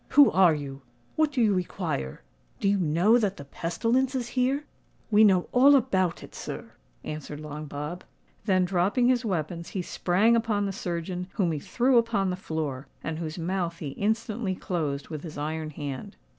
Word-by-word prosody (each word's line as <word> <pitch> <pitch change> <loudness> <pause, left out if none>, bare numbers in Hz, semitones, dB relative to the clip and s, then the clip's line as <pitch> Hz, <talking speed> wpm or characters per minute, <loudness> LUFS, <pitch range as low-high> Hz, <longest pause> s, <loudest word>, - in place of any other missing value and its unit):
Who 285 -2 +9
are 180 -4 +5
you? 140 -2 -6 0.3
what 310 -1 +2
do 255 -4 +2
you 210 -2 +4
require? 170 - -3 0.4
Do - - 0
you 200 0 +3
know 180 +8 +4
that 200 -4 0
the 140 - -9
pestilence 235 - 0
is 245 -2 -2
here?" 260 +4 +1 0.5
"We 210 +1 +6
know 190 -4 +4
all 275 +3 +7
about 190 -10 +1
it, - - -12
sir," - - -7 0.3
answered 150 -1 -6
Long 150 0 -7
Bob. 150 +5 -5 0.4
Then, 185 -3 +3
dropping 195 +7 +2
his 255 -1 +2
weapons, 170 -4 -3
he 180 - -1
sprang 200 +7 +2
upon 220 -3 +1
the 195 - -1
surgeon, 180 0 -4
whom 180 -5 +1
he 155 - -2
threw 240 - +3
upon 210 -5 0
the - - -1
floor, 155 -7 -4 0.2
and 160 -1 -3
whose 160 -1 -4
mouth 170 0 -2
he 150 -4 -5
instantly 215 - -1
closed 150 -7 -3
with 155 -2 -5
his 155 -3 -8
iron 155 +1 -3
hand. 140 -3 -6
180 Hz, 180 wpm, -27 LUFS, 155-220 Hz, 0.5 s, Who